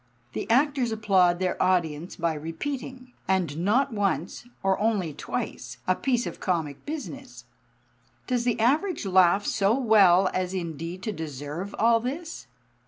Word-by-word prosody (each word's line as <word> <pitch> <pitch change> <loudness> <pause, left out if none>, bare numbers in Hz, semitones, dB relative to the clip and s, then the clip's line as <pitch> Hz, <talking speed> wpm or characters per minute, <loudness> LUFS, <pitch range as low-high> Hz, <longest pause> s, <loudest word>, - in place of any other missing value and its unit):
The - - -4
actors 260 0 +2
applaud 190 -5 +3
their 185 0 -1
audience 175 -3 0
by 170 -1 0
repeating 250 - -6
and 185 -6 +1
not 240 +9 +2
once 195 - -2 0.2
or 195 0 +2
only 205 -8 0
twice 125 -3 -5
a 185 - +4
piece 245 +4 0
of - - -6
comic 160 -6 -2
business. 280 -3 -7 0.8
Does 245 -2 0
the 240 -2 0
Average 295 - +1
laugh 190 +1 +4
so 205 +3 +2
well 195 -7 +5
as 185 0 -2
indeed 170 +1 -5
to 215 - -2
deserve 155 +4 -6
all 230 +1 +4
this? 295 - -5
195 Hz, 140 wpm, -26 LUFS, 175-245 Hz, 0.8 s, well